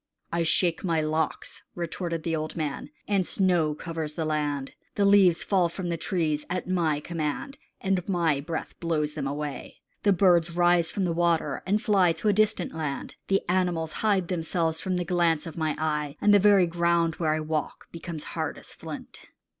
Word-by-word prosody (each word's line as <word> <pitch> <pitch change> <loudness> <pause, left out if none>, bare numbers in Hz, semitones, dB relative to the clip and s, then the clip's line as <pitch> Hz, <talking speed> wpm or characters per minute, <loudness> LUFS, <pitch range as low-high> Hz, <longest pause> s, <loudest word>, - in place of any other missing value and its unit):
"I 170 - 0
shake 165 +1 +2
my 165 -4 +1
locks," 155 +1 -2
retorted 170 -1 -3
the 165 -1 -1
old 155 0 -4
man, 150 -4 -3 0.2
"and 200 -2 +2
snow 175 -5 +1
covers 160 -2 -5
the 160 - -2
land. 145 -3 -2 0.2
The 200 - +2
leaves 195 -4 +5
fall 185 -4 +2
from 175 +1 -5
the 170 - 0
trees 160 -3 -1
at 180 0 -3
my 165 -5 +1
command, 165 - -4 0.2
and 190 -1 -1
my 165 -6 +2
breath 160 +3 -5
blows 155 -3 -1
them 145 -3 -3
away. 145 0 -5 0.2
The 205 - +3
birds 175 -3 +3
rise 175 -1 +4
from 195 - -1
the 170 - 0
water 165 -4 +1
and 205 +2 +2
fly 195 -7 +3
to 210 - -1
a - - +4
distant 215 -3 +1
land. 150 -4 -4
The 195 0 +1
animals 175 -3 0
hide 200 -5 +2
themselves 165 -2 -1
from 185 -1 -1
the 180 -1 -1
glance 170 -2 +1
of 165 - -7
my 155 -2 -1
eye, 150 -2 -1
and 205 - +4
the 205 - +7
very 200 -2 +5
ground 170 -1 +1
where 155 -2 +1
I - - -1
walk 155 -1 -3
becomes 170 -2 -7
as - - -9
hard - - -3
as - - -10
flint." - - -8
170 Hz, 190 wpm, -27 LUFS, 155-180 Hz, 0.2 s, the